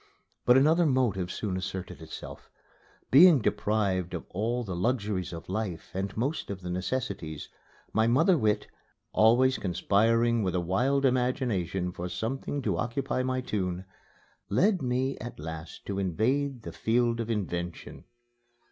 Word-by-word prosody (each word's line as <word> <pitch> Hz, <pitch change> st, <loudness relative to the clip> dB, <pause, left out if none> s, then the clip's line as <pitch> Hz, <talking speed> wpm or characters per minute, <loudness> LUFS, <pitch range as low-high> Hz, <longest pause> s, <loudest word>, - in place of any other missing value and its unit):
But 125 Hz, +1 st, +6 dB
another 160 Hz, +5 st, +4 dB
motive 110 Hz, -10 st, +1 dB
soon 100 Hz, -4 st, -3 dB
asserted 95 Hz, 0 st, -5 dB
itself. -, -, -9 dB, 0.6 s
Being 160 Hz, +2 st, +8 dB
deprived 100 Hz, -5 st, 0 dB
of 85 Hz, -, -6 dB
all 115 Hz, +6 st, -1 dB
the 95 Hz, -5 st, -5 dB
luxuries 100 Hz, -2 st, -1 dB
of 85 Hz, -1 st, -8 dB
life 95 Hz, -3 st, -4 dB
and 95 Hz, +2 st, -3 dB
most 135 Hz, +8 st, -2 dB
of 100 Hz, -1 st, -5 dB
the 90 Hz, -1 st, -5 dB
necessities, 90 Hz, -, -3 dB, 0.4 s
my 110 Hz, +1 st, +3 dB
mother 160 Hz, +10 st, +4 dB
wit, 105 Hz, -6 st, +1 dB, 0.5 s
always 125 Hz, +4 st, +4 dB
conspiring 115 Hz, +6 st, +2 dB
with 95 Hz, -3 st, -1 dB
a -, -, +2 dB
wild 125 Hz, +11 st, +1 dB
imagination 125 Hz, -, 0 dB
for 90 Hz, 0 st, -5 dB
something 130 Hz, +8 st, -3 dB
to -, -, 0 dB
occupy 125 Hz, +2 st, -1 dB
my 130 Hz, 0 st, -1 dB
tune, 95 Hz, -6 st, -3 dB, 0.6 s
led 185 Hz, -, +3 dB
me 130 Hz, +1 st, -1 dB
at 120 Hz, -6 st, -8 dB
last 80 Hz, +1 st, -8 dB
to 100 Hz, -1 st, -3 dB
invade 120 Hz, -, 0 dB
the -, -, -7 dB
field 115 Hz, +1 st, +1 dB
of 115 Hz, -1 st, -3 dB
invention. 90 Hz, -6 st, -4 dB
110 Hz, 140 wpm, -28 LUFS, 95-130 Hz, 0.6 s, Being